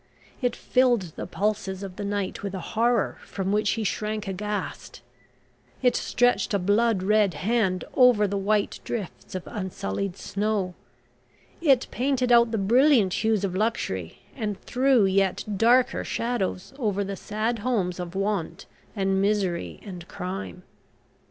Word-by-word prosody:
It 245 -2 0
filled 240 -10 +2
the - - -5
pulses 200 -2 -2
of 190 -2 -7
the 205 - -5
night 200 -1 -2
with 200 -1 -4
a - - -3
horror 235 0 +1
from 195 -1 -3
which 210 0 +2
he 225 - -1
shrank 215 0 -2
aghast, 205 +2 -4 0.8
it 250 - +4
stretched 245 -3 +1
a - - +4
blood 205 +1 +2
red 210 -1 +3
hand 195 -4 0
over 250 -5 +5
the 200 - -3
white 200 +1 0
drifts 205 -4 -6
of 185 - -3
unsullied 190 - -4
snow, 200 -3 -1 0.9
it 270 -6 +4
painted 255 -1 0
out 235 -1 +6
the 225 - -1
brilliant 230 -1 +4
hues 220 -2 +2
of 185 -2 -1
luxury, 95 - -2
and 210 -5 -3
threw 255 -4 +3
yet 190 -1 +1
darker 240 +5 +3
shadows 230 -3 -2
over 205 -5 0
the 195 0 -4
sad 220 +4 -2
homes 205 -6 -1
of 175 0 -6
want 195 -4 -2 0.3
and 195 -1 +1
misery 195 -4 0
and 180 -4 -8
crime. 185 -1 -6
205 Hz, 145 wpm, -26 LUFS, 190-230 Hz, 0.9 s, out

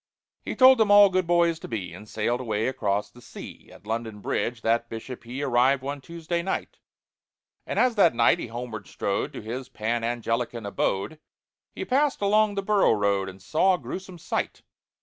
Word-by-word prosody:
He - - -4
told 260 -1 +7
them 220 -2 +3
all 205 -1 +8
good 185 -2 0
boys 170 -1 +3
to - - -8
be, 95 -7 -5
And 105 +4 -11
sailed 115 +3 -1
away 110 -3 -1
across 105 -6 -1
the 120 - -16
sea, - - -11
At - - -16
London 110 -1 -4
Bridge 120 +3 -2
that 115 +1 +1
Bishop 115 +2 -8
he 130 +4 -5
Arrived 130 +1 +3
one 140 +1 -4
Tuesday 170 +3 -3
night; 190 +2 -4 0.9
And - - -3
as 250 -1 +4
that 175 -9 +5
night 115 0 +4
he - - -5
homeward 115 -2 -7
strode 100 - -2
To - - -7
his 125 +4 -6
Pan 115 -1 -2
Anglican 115 -1 -2
abode, 100 +7 -2 0.6
He - - -4
passed 280 +2 +1
along 210 +1 +3
the 195 - -2
Borough 200 - +3
Road, 100 -2 0
And 95 0 -12
saw 185 - +3
a - - -5
gruesome 185 0 -7
sight. - - -3
125 Hz, 190 wpm, -26 LUFS, 110-175 Hz, 0.9 s, all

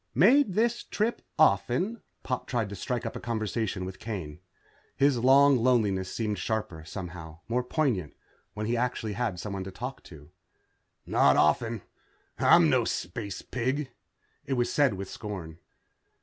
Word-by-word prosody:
"Made 235 - +5
this 235 +2 +2
trip 220 +3 -2 0.2
often?" 155 - +2 0.2
Pop 125 -2 -3
tried 115 -5 -1
to 100 - -6
strike 125 +2 -3
up 115 - -4
a - - -4
conversation 110 -4 -2
with 95 0 -7
Kane. 85 -9 -6 0.6
His 140 -3 +3
long 135 +2 +6
loneliness 105 -6 +2
seemed 105 -4 -2
sharper, 95 -6 -3
somehow, 85 -2 -8
more 120 +2 +1
poignant, 125 - -1 0.4
when 105 0 -3
he 115 +2 0
actually 120 -3 -1
had 110 -5 -2
someone 100 -1 -4
to 95 - -6
talk 125 +8 -6
to. 75 -1 -14 0.7
"Not - - +4
often. 110 +8 +2 0.6
I'm - - +6
no - - +3
space 100 +2 -4
pig." 130 +2 -2 0.6
It 135 - 0
was 120 -2 0
said 140 -8 +3
with 95 0 -5
scorn. 90 -7 -7
115 Hz, 150 wpm, -28 LUFS, 95-130 Hz, 0.7 s, long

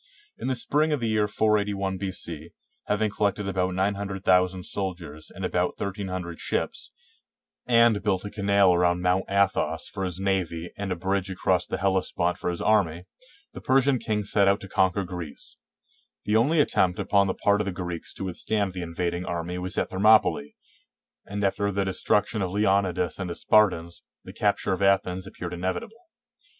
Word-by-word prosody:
In - - -4
the 130 - 0
spring 150 +5 +1
of 150 - +1
the 115 -2 -1
year 105 -1 +2
481 100 -3 0
B.C., 85 -4 -4 0.4
ha\dng 105 0 +1
collected 105 -1 0
about 95 -1 -1
900,000 95 -2 +1
soldiers 85 -7 -5
and 95 +1 -6
about 90 0 -1
1300 95 -3 -4
ships, - - -2 0.8
and 115 -3 +4
built 100 -2 0
a 100 - -5
canal 100 -2 +3
around 90 0 +2
Mount 90 +1 +2
Athos 95 -5 +1
for 95 -1 -5
his 90 -1 -3
navy 90 -4 -1
and 100 -2 -4
a - - 0
bridge 95 +2 -1
across 95 0 0
the - - -2
Hellespont 95 -2 0
for - - -2
his 85 - -3
army, 90 -6 +2 0.5
the - - -8
Persian 135 -1 +3
king 105 -2 -1
set 100 0 +2
out 100 +1 +3
to 100 - -8
conquer 95 +1 +1
Greece. 90 -5 -7 0.7
The 105 - +1
only 140 +9 +3
attempt 90 -10 +3
upon 100 0 +2
the 95 - -1
part 100 0 +2
of - - -2
the 100 - -2
Greeks 90 -2 -5
to - - -5
A^dthstand 100 +2 -1
the 90 - -5
invading 85 +1 -3
army 85 +1 -3
was 90 0 -5
at - - -1
Thermopylae, 95 -7 +3 0.7
and 100 +1 -4
after 100 +1 +1
the 100 0 -1
destruction 105 +3 0
of 95 - -1
Leonidas 95 -3 +1
and 95 -2 -3
his 85 - -4
Spartans, 90 -6 +2 0.2
the - - -10
capture 100 -1 0
of 95 - -3
Athens 95 -1 +1
appeared 90 -2 -7
ine 90 - -6
vitable. 95 - -4
95 Hz, 175 wpm, -26 LUFS, 90-100 Hz, 0.8 s, and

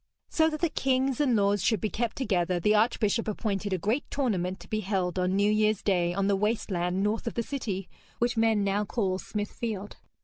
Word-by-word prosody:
So 320 -1 +3
that 310 -1 -5
the 340 - +2
kings 265 -1 +1
and 260 -5 +3
lords 200 -2 +2
should 220 -2 +2
be 215 - -2
kept 235 -1 -2
together, 180 -8 0
the 210 +5 +3
archbishop 220 0 +2
appointed 205 -2 -2
a 185 - +1
great 215 - 0
tournament 190 -9 -1
to - - -12
be 215 - -1
held 190 -3 -1
on 180 +1 +1
New 205 +1 +3
Year's 215 -1 +2
Day 175 -4 +2
on 195 +2 0
the 200 0 +3
waste 210 +2 -1
land 180 +1 0
north 215 +3 -1
of - - -3
the 235 - 0
city, 205 -8 -4 0.3
which 240 +1 0
men 225 -2 +3
now 200 +1 +1
call 195 -3 -1
Smithfield. 210 0 -4
210 Hz, 210 wpm, -28 LUFS, 190-230 Hz, 0.3 s, So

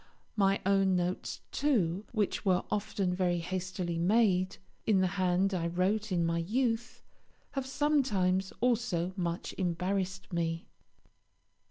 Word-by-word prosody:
My 195 -2 +3
own 195 -1 +3
notes, 180 +1 -2
too, 210 - +1
which 215 -4 0
were 185 -2 +2
often 200 -3 0
very 180 -1 +1
hastily 180 0 -3
made, 185 -1 +3 0.3
in 210 -4 +4
the 185 - +3 0.2
hand 185 +2 +2
I 170 -2 0
wrote 195 +5 0
in 170 -2 +2
my 165 0 0
youth, 225 +5 -1 0.5
have 270 -2 -3
sometimes 210 -11 +1
also 225 -8 +1
much 175 -2 -3
embarrassed 185 +1 -2
me. 165 -1 -1
185 Hz, 125 wpm, -31 LUFS, 180-210 Hz, 0.5 s, in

